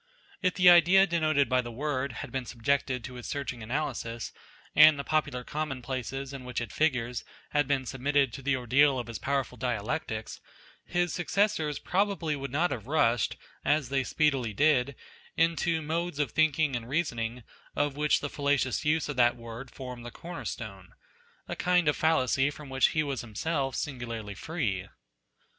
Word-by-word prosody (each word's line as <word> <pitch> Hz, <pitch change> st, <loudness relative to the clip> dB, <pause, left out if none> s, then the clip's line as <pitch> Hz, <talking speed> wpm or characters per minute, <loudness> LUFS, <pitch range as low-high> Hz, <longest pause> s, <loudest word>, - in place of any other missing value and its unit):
If 185 Hz, -1 st, +1 dB
the 180 Hz, -1 st, +4 dB
idea 175 Hz, +2 st, +8 dB
denoted 155 Hz, -5 st, +2 dB
by 130 Hz, 0 st, +2 dB
the 120 Hz, -1 st, -7 dB
word 140 Hz, +1 st, -2 dB
had -, -, -8 dB
been 130 Hz, -3 st, -3 dB
subjected 130 Hz, +1 st, 0 dB
to 125 Hz, -, -7 dB
his 125 Hz, -1 st, -8 dB
searching 135 Hz, -4 st, -4 dB
analysis, 120 Hz, -2 st, -3 dB, 0.4 s
and 155 Hz, 0 st, +8 dB
the 140 Hz, -, -3 dB
popular 140 Hz, -5 st, 0 dB
common 145 Hz, -3 st, -4 dB
places 135 Hz, +2 st, -4 dB
in 135 Hz, -2 st, -7 dB
which 125 Hz, -1 st, -3 dB
it 120 Hz, -, -5 dB
figures 125 Hz, -6 st, 0 dB, 0.3 s
had 145 Hz, -2 st, +2 dB
been 135 Hz, -2 st, 0 dB
submitted 135 Hz, 0 st, +1 dB
to 135 Hz, -, -7 dB
the 140 Hz, 0 st, +1 dB
ordeal 130 Hz, +3 st, +3 dB
of 120 Hz, -, -3 dB
his 115 Hz, -1 st, -6 dB
powerful 135 Hz, -3 st, -2 dB
dialectics, 115 Hz, -1 st, -3 dB, 0.4 s
his 175 Hz, -1 st, 0 dB
successors 175 Hz, -5 st, +1 dB
probably 190 Hz, -5 st, 0 dB
would 140 Hz, -1 st, -5 dB
not 160 Hz, +7 st, +1 dB
have 115 Hz, -1 st, -5 dB
rushed, 120 Hz, -6 st, +2 dB, 0.3 s
as 145 Hz, -3 st, +1 dB
they 135 Hz, -1 st, +1 dB
speedily 135 Hz, -6 st, +1 dB
did, 140 Hz, 0 st, +3 dB, 0.4 s
into 165 Hz, 0 st, +2 dB
modes 165 Hz, +1 st, -2 dB
of 145 Hz, -5 st, 0 dB
thinking 155 Hz, -2 st, +2 dB
and 120 Hz, 0 st, -5 dB
reasoning 125 Hz, -6 st, -2 dB, 0.3 s
of 145 Hz, -1 st, 0 dB
which 150 Hz, +1 st, +2 dB
the 145 Hz, -, -2 dB
falla 145 Hz, 0 st, +1 dB
cious 130 Hz, -1 st, -1 dB
use 155 Hz, +1 st, +1 dB
of 145 Hz, -3 st, -5 dB
that 120 Hz, -1 st, +4 dB
word 115 Hz, +2 st, -8 dB
formed 125 Hz, -2 st, -8 dB
the 120 Hz, -, -6 dB
corner 170 Hz, +7 st, -8 dB
stone; 100 Hz, -5 st, -7 dB, 0.5 s
a -, -, -4 dB
kind 180 Hz, -2 st, +2 dB
of 150 Hz, -, +3 dB
fallacy 140 Hz, -3 st, +2 dB
from 145 Hz, -1 st, -10 dB
which 135 Hz, 0 st, +4 dB
he 155 Hz, -, 0 dB
was 140 Hz, -4 st, -3 dB
himself 135 Hz, +5 st, -2 dB
singularly 115 Hz, -6 st, -4 dB
free. 100 Hz, -, -3 dB
140 Hz, 175 wpm, -29 LUFS, 125-155 Hz, 0.5 s, idea